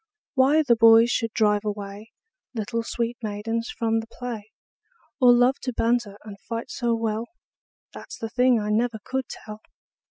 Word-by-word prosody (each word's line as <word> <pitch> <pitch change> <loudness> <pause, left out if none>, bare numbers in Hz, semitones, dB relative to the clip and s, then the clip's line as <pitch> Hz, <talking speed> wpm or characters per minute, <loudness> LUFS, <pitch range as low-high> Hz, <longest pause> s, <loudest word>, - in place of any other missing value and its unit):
Why 285 +3 +4
the 245 -5 +4
boys 230 +1 +6
should 230 -2 -1
drive 210 -1 +2
away 205 0 -6 0.4
Little 230 +1 -2
sweet 235 +1 -3
maidens 225 +2 -3
from 225 -1 0
the 225 - -7
play, 230 -3 -7 0.7
Or 250 -2 +7
love 245 +2 +4
to 255 - -3
banter 230 -3 0
and 205 -2 -10
fight 230 0 -4
so 235 -2 0
well, 225 0 -2 0.7
That - - -11
's - - -7
the 225 - -5
thing 250 -1 +3
I 210 0 -2
never 230 +1 +1
could 265 0 -2
tell. 215 0 -9
230 Hz, 165 wpm, -24 LUFS, 215-245 Hz, 0.7 s, Or